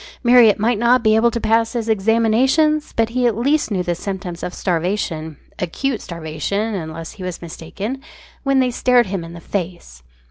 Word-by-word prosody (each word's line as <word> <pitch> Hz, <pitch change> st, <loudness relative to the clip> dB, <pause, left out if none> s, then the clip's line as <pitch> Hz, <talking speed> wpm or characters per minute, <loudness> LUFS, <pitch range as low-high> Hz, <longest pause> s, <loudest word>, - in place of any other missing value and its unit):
Marriott 240 Hz, -3 st, +6 dB
might 220 Hz, +1 st, +1 dB
not 240 Hz, +1 st, +3 dB
be 215 Hz, -1 st, +4 dB
able 230 Hz, +2 st, +4 dB
to 235 Hz, -, -3 dB
pass 225 Hz, +1 st, +1 dB
his 235 Hz, -2 st, -3 dB
examinations, 230 Hz, +8 st, +2 dB
but 225 Hz, 0 st, 0 dB
he 245 Hz, +1 st, +1 dB
at 225 Hz, -3 st, 0 dB
least 280 Hz, +5 st, +1 dB
knew 190 Hz, -4 st, -1 dB
the 175 Hz, -, -1 dB
symptoms 185 Hz, -1 st, -6 dB
of 180 Hz, -, -4 dB
starvation 170 Hz, -4 st, -2 dB, 0.2 s
acute 225 Hz, +8 st, -2 dB
starvation, 170 Hz, +6 st, -3 dB
unless 165 Hz, -3 st, -6 dB
he 190 Hz, -, -10 dB
was 180 Hz, -2 st, -4 dB
much -, -, -15 dB
mistaken 205 Hz, +12 st, -6 dB, 0.4 s
when 275 Hz, -1 st, +1 dB
they 255 Hz, -1 st, +2 dB
stared 245 Hz, 0 st, +3 dB
him 190 Hz, -3 st, -4 dB
in 165 Hz, 0 st, -9 dB
the 170 Hz, -, -9 dB
face. 170 Hz, -, -5 dB
215 Hz, 185 wpm, -19 LUFS, 175-240 Hz, 0.4 s, Marriott